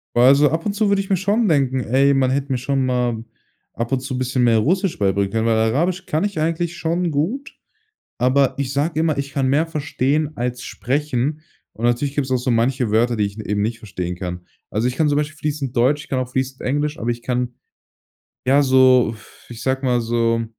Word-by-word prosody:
Boah, 120 Hz, -, +5 dB
also 140 Hz, +2 st, +6 dB
ab 165 Hz, +1 st, -2 dB
und 205 Hz, -, 0 dB
zu 210 Hz, 0 st, +1 dB
würde 200 Hz, 0 st, +2 dB
ich 195 Hz, -, -9 dB
mir 190 Hz, -, +3 dB
schon 205 Hz, +5 st, +1 dB
denken: 135 Hz, -6 st, +2 dB
„Ey, 135 Hz, +4 st, +3 dB
man 130 Hz, -1 st, +2 dB
hätte 140 Hz, 0 st, -1 dB
mir 130 Hz, -, +1 dB
schon 135 Hz, +1 st, 0 dB
mal 125 Hz, -3 st, -1 dB, 0.5 s
ab 115 Hz, 0 st, -4 dB
und 135 Hz, -, +1 dB
zu 130 Hz, -1 st, -4 dB
bisschen 130 Hz, 0 st, 0 dB
mehr 115 Hz, -2 st, +4 dB
Russisch 185 Hz, -, 0 dB
beibringen 100 Hz, -1 st, +1 dB
können“, 115 Hz, 0 st, 0 dB
weil 115 Hz, -1 st, +2 dB
Arabisch 170 Hz, +12 st, 0 dB
kann 155 Hz, +5 st, -1 dB
ich 200 Hz, -6 st, -2 dB
eigentlich 165 Hz, +2 st, -1 dB
schon 170 Hz, +1 st, -1 dB
gut. 200 Hz, -, -2 dB, 0.6 s
Aber 130 Hz, +2 st, +3 dB
ich 140 Hz, -2 st, -2 dB
sage 150 Hz, +3 st, 0 dB
immer, 160 Hz, -3 st, +1 dB
ich 140 Hz, 0 st, -4 dB
kann 135 Hz, -2 st, +1 dB
mehr 145 Hz, +5 st, +2 dB
verstehen 150 Hz, -1 st, -1 dB
als 125 Hz, +1 st, -3 dB
sprechen. 145 Hz, +2 st, -2 dB, 0.3 s
Und 115 Hz, -, -3 dB
natürlich 120 Hz, +4 st, +1 dB
gibt's 135 Hz, -3 st, -1 dB
auch 130 Hz, -, +3 dB
so 125 Hz, +1 st, -1 dB
manche 120 Hz, 0 st, +1 dB
Wörter, 120 Hz, +2 st, +2 dB
die 105 Hz, -, 0 dB
ich 100 Hz, +2 st, -6 dB
n 110 Hz, -, -7 dB
eben 105 Hz, 0 st, -1 dB
nicht 115 Hz, +2 st, -2 dB
verstehen 90 Hz, -5 st, -5 dB
kann. 90 Hz, -1 st, -6 dB, 0.2 s
Also, 110 Hz, +4 st, 0 dB
ich 125 Hz, -, -2 dB
kann 155 Hz, 0 st, +2 dB
zum 145 Hz, -, +1 dB
Beispiel 150 Hz, 0 st, -2 dB
fließend 145 Hz, -4 st, -3 dB
Deutsch, 135 Hz, +5 st, +2 dB
ich -, -, -18 dB
kann 130 Hz, -, 0 dB
auch 130 Hz, -1 st, -3 dB
fließend 130 Hz, +1 st, -3 dB
Englisch, 145 Hz, +3 st, -1 dB
aber 115 Hz, -, -2 dB
ich 120 Hz, 0 st, -2 dB
kann 125 Hz, -1 st, -2 dB, 0.9 s
ja 140 Hz, +3 st, +5 dB
so 130 Hz, -3 st, +5 dB
f 110 Hz, -, -18 dB
ich 120 Hz, -1 st, -9 dB
sage 135 Hz, +1 st, -1 dB
mal, 125 Hz, -2 st, +2 dB
so 115 Hz, 0 st, 0 dB
130 Hz, 225 wpm, -20 LUFS, 120-150 Hz, 0.9 s, also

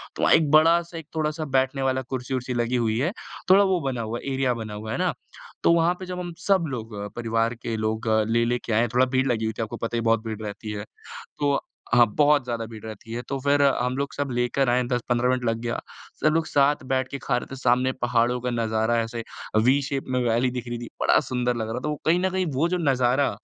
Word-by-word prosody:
तो -, -, -5 dB
वहाँ -, -, +5 dB
एक 155 Hz, -3 st, +2 dB
बड़ा-सा 165 Hz, +2 st, +4 dB
एक 160 Hz, -2 st, -8 dB
थोड़ा-सा 155 Hz, 0 st, -1 dB
बैठने 130 Hz, +1 st, 0 dB
वाला 130 Hz, 0 st, +1 dB
कुर्सी-वुर्सी 130 Hz, 0 st, -3 dB
लगी 120 Hz, +1 st, 0 dB
हुई 115 Hz, -2 st, +1 dB
है। 155 Hz, +7 st, +1 dB, 0.4 s
थोड़ा 200 Hz, +1 st, +7 dB
वो 190 Hz, -2 st, +2 dB
बना 125 Hz, -3 st, -3 dB
हुआ 115 Hz, +2 st, -4 dB
है, 135 Hz, -, -4 dB
एरिया 130 Hz, -2 st, +1 dB
बना 110 Hz, -2 st, -6 dB
हुआ 110 Hz, +1 st, -6 dB
है। -, -, -2 dB
है -, -, 0 dB
ना? -, -, +1 dB, 0.5 s
तो 170 Hz, -, +5 dB
वहाँ 170 Hz, +1 st, +3 dB
पे 185 Hz, -, -6 dB
जब 180 Hz, 0 st, -5 dB
हम 175 Hz, -1 st, -5 dB
सब 190 Hz, -4 st, +3 dB
लोग, 115 Hz, -4 st, -6 dB, 0.2 s
परिवार 115 Hz, 0 st, 0 dB
के 115 Hz, -1 st, -4 dB
लोग 110 Hz, +1 st, -2 dB, 0.2 s
ले-ले 115 Hz, +1 st, +2 dB
के 115 Hz, -, -1 dB
आए, 115 Hz, +2 st, +3 dB
थोड़ा 130 Hz, +1 st, +5 dB
भीड़ 130 Hz, +1 st, 0 dB
लगी 110 Hz, -3 st, 0 dB
हुई 110 Hz, -, -1 dB
थी। -, -, +1 dB
आपको 110 Hz, -, -6 dB
पता 115 Hz, +1 st, -3 dB
ही -, -, +1 dB
है, -, -, -3 dB
बहुत 115 Hz, 0 st, +2 dB
भीड़ 110 Hz, -1 st, -5 dB
रहती 105 Hz, +1 st, -6 dB
है। 105 Hz, 0 st, -5 dB, 0.5 s
तो 145 Hz, -1 st, +2 dB, 0.3 s
हाँ, 120 Hz, -1 st, +7 dB
बहुत 150 Hz, -2 st, +4 dB
ज़्यादा 115 Hz, -2 st, -3 dB
भीड़ 110 Hz, -2 st, -10 dB
रहती 110 Hz, +1 st, -8 dB
है 120 Hz, -, -3 dB
तो 140 Hz, -, -1 dB
फिर 145 Hz, +1 st, +3 dB
हम 125 Hz, -2 st, +2 dB
लोग 140 Hz, 0 st, -2 dB
सब 140 Hz, -1 st, -2 dB
लेकर 120 Hz, +2 st, +1 dB
आए 125 Hz, +1 st, +2 dB
10-15 125 Hz, 0 st, +1 dB
मिनट 130 Hz, -1 st, 0 dB
लग 115 Hz, 0 st, +1 dB
गया। 120 Hz, 0 st, -2 dB, 0.4 s
सब -, -, +3 dB
लोग 165 Hz, 0 st, +1 dB
साथ 145 Hz, 0 st, +2 dB
बैठ 130 Hz, 0 st, +1 dB
के 140 Hz, -, -4 dB
खा 125 Hz, -2 st, +1 dB
रहे -, -, -5 dB
थे। -, -, -5 dB
सामने 130 Hz, +1 st, +2 dB
पहाड़ों 120 Hz, 0 st, +2 dB
का 125 Hz, -, -1 dB
नज़ारा 110 Hz, 0 st, 0 dB
ऐसे 115 Hz, 0 st, -4 dB, 0.4 s
वी 135 Hz, +3 st, +4 dB
शेप 135 Hz, 0 st, -3 dB
में -, -, +2 dB
वैली 120 Hz, +2 st, +2 dB
दिख 125 Hz, -1 st, -5 dB
रही 120 Hz, 0 st, -3 dB
थी, 120 Hz, -, -7 dB
बड़ा -, -, +5 dB
सुंदर 125 Hz, -1 st, 0 dB
लग 110 Hz, -1 st, -3 dB
रहा 115 Hz, +3 st, -3 dB
था -, -, 0 dB
वो। 150 Hz, -, -1 dB
कहीं 170 Hz, +3 st, +4 dB
न 190 Hz, +1 st, +1 dB
कहीं 185 Hz, 0 st, -1 dB
वो 145 Hz, +6 st, +2 dB
जो 180 Hz, -, 0 dB
नज़ारा 135 Hz, -3 st, +2 dB
125 Hz, 255 wpm, -25 LUFS, 115-140 Hz, 0.5 s, थोड़ा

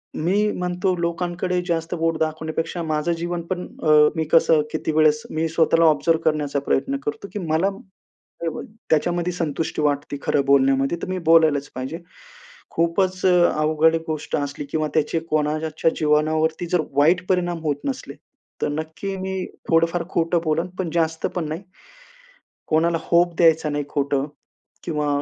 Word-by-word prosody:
मी 200 Hz, +6 st, +1 dB
म्हणतो, 180 Hz, +1 st, -1 dB
लोकांकडे 175 Hz, +1 st, -1 dB
जास्त 165 Hz, 0 st, -1 dB
बोट 165 Hz, -1 st, 0 dB
दाखवण्यापेक्षा 160 Hz, +2 st, -2 dB
माझं 155 Hz, +1 st, -1 dB
जीवन 175 Hz, +1 st, -3 dB
पण, 180 Hz, -1 st, -2 dB, 0.2 s
अ, 155 Hz, -, +1 dB, 0.3 s
मी 160 Hz, -, 0 dB
कसं 160 Hz, -1 st, +5 dB
किती 160 Hz, -, -2 dB
वेळेस 155 Hz, -1 st, +4 dB
मी 160 Hz, +1 st, 0 dB
स्वतःला 165 Hz, 0 st, +3 dB
ऑब्झर्व्ह 160 Hz, +1 st, +3 dB
करण्याचा 150 Hz, -2 st, +1 dB
प्रयत्न 135 Hz, +1 st, +1 dB
करतो, 150 Hz, +7 st, -4 dB
की 210 Hz, -, -3 dB
मला 165 Hz, +2 st, +1 dB
स्टेबल 190 Hz, -4 st, -9 dB, 0.3 s
त्याच्यामध्ये 175 Hz, +3 st, +1 dB
संतुष्टी 160 Hz, -2 st, -2 dB
वाटते 145 Hz, -1 st, -1 dB
खरं 140 Hz, -, +1 dB
बोलण्यामध्ये. 135 Hz, +2 st, +3 dB
तर -, -, -3 dB
मी 185 Hz, 0 st, -2 dB
बोलायलाच 155 Hz, -4 st, +5 dB
पाहिजे. 130 Hz, +6 st, -5 dB, 0.7 s
खूपच 180 Hz, +3 st, 0 dB
अ, 185 Hz, -, +6 dB, 0.3 s
अवघड 155 Hz, +1 st, +3 dB
गोष्ट 155 Hz, -2 st, -3 dB
असली 145 Hz, 0 st, -4 dB
किंवा 155 Hz, -1 st, 0 dB
त्याचे 155 Hz, +2 st, +1 dB
कोणाच्या 155 Hz, +1 st, 0 dB
जीवनावरती 155 Hz, +2 st, +1 dB
जर 180 Hz, -3 st, +3 dB, 0.2 s
वाईट 170 Hz, +5 st, +4 dB
परिणाम 175 Hz, -2 st, 0 dB
होत 150 Hz, -2 st, 0 dB
नसले, 265 Hz, -1 st, -4 dB, 0.5 s
तर -, -, +1 dB
नक्की 160 Hz, +6 st, -4 dB
मी 190 Hz, 0 st, -3 dB, 0.2 s
थोडंफार 165 Hz, +1 st, +2 dB
खोटं 170 Hz, 0 st, +1 dB
बोलेन, 160 Hz, +3 st, 0 dB
पण 180 Hz, -3 st, -1 dB
जास्त 160 Hz, -1 st, 0 dB
पण 170 Hz, -4 st, -2 dB
नाही. 160 Hz, +4 st, -4 dB, 1.1 s
कोणाला 165 Hz, +1 st, +2 dB
होप 175 Hz, 0 st, +2 dB
द्यायचा 160 Hz, -2 st, +4 dB
नाही 145 Hz, 0 st, -2 dB
खोटं 140 Hz, -1 st, 0 dB, 0.6 s
किंवा 150 Hz, -3 st, -1 dB
160 Hz, 150 wpm, -22 LUFS, 150-175 Hz, 1.1 s, अ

